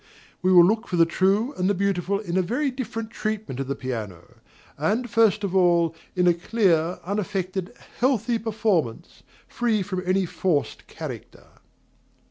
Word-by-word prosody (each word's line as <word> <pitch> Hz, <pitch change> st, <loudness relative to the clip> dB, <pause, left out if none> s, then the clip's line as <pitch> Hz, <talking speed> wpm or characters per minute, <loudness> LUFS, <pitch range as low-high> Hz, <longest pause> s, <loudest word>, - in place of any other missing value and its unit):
We 185 Hz, -, +2 dB
will 175 Hz, -2 st, +8 dB
look 220 Hz, +5 st, +1 dB
for -, -, -2 dB
the 165 Hz, -1 st, +5 dB
true 195 Hz, -, +1 dB
and 185 Hz, +1 st, +1 dB
the 205 Hz, -, +2 dB
beautiful 195 Hz, 0 st, 0 dB
in 190 Hz, -4 st, -4 dB
a 185 Hz, -, +4 dB
very 255 Hz, +10 st, -1 dB
different 225 Hz, -3 st, -5 dB
treatment 215 Hz, -, -4 dB
of 135 Hz, -, -3 dB
the 140 Hz, -, -2 dB
piano; 110 Hz, -10 st, -6 dB, 0.4 s
and, 215 Hz, -, 0 dB
first 220 Hz, -2 st, +3 dB
of 195 Hz, -1 st, -2 dB
all, 170 Hz, -3 st, +3 dB, 0.2 s
in 180 Hz, -1 st, +2 dB
a 175 Hz, -, +6 dB
clear, 175 Hz, -2 st, +1 dB
unaffected, 190 Hz, -2 st, -3 dB, 0.3 s
healthy 240 Hz, -2 st, +1 dB
performance, 210 Hz, -, -1 dB, 0.3 s
free 225 Hz, -4 st, 0 dB
from 185 Hz, -1 st, -3 dB
any 185 Hz, +1 st, +1 dB
forced 170 Hz, -3 st, -2 dB
character. -, -, -8 dB
190 Hz, 155 wpm, -24 LUFS, 170-220 Hz, 0.4 s, will